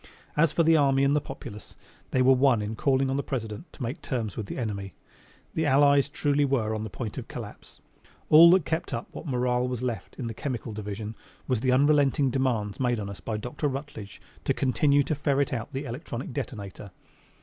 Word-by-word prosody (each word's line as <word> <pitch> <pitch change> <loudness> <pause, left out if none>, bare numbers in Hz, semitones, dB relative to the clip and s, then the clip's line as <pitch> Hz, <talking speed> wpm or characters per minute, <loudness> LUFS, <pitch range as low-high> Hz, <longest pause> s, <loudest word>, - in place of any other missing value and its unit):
As 150 0 +4
for 165 - +2
the 165 0 +5
army 135 -2 +4
and 140 +1 +3
the 150 - +2
populace, 120 -7 -9 0.3
they 130 - +2
were 130 +1 +6
one 130 -2 +4
in 105 +1 -3
calling 135 +2 +2
on 135 - 0
the - - +1
President 120 - -5
to 135 - -7
make 120 +4 -4
terms 115 -7 -3
with 105 - -5
the - - -6
enemy. 100 -6 -4 0.6
The 160 -1 0
allies 140 0 +4
truly 145 0 +1
were 125 -6 +1
on 110 0 -3
the 110 - -5
point 105 +4 -5
of - - -9
collapse. - - -10 0.5
All 165 +2 +9
that 180 -3 +5
kept 160 -5 -2
up 115 - -6
what - - -8
morale 125 -1 +1
was 125 -1 -3
left 115 -7 -4
in 125 - -5
the 115 - -3
chemical 120 -2 -4
division 105 +1 -5 0.3
was 125 -4 +1
the 130 - +2
unrelenting 140 0 +3
demands 120 -6 -1
made 120 -3 +1
on 100 -1 -4
us 100 - -9
by 110 -2 -3
Dr. 125 +7 -3
Rutledge 135 -7 -6 0.2
to - - +1
continue 140 +3 +3
to 155 - -1
ferret 140 -2 0
out 115 -3 -4
the 135 +1 -4
electronic 125 0 -6
detonator. 100 -4 -6
130 Hz, 205 wpm, -27 LUFS, 110-140 Hz, 0.6 s, All